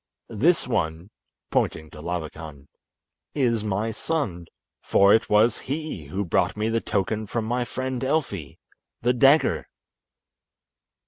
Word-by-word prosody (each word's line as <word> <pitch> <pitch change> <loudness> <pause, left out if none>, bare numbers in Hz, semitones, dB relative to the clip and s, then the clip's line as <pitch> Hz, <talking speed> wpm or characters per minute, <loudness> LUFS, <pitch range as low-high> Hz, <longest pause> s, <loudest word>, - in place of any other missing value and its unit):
This 155 - +3
one" 85 -4 -2 0.4
(pointing 80 0 0
to 75 - -10
Labakan) 80 -4 -6 0.7
"is 120 -6 +1
my 105 +2 -1
son, 105 - -3 0.3
for 100 0 +5
it 110 - +2
was 105 +3 +4
he 145 - -5
who 95 +8 -3
brought 85 - +1
me 110 +1 0
the 115 0 0
token 105 +2 -1
from 115 +2 -2
my 120 +2 -1
friend 130 0 -4
Elfi—the 125 - -3
dagger." 135 +5 +4
110 Hz, 120 wpm, -25 LUFS, 90-125 Hz, 0.7 s, for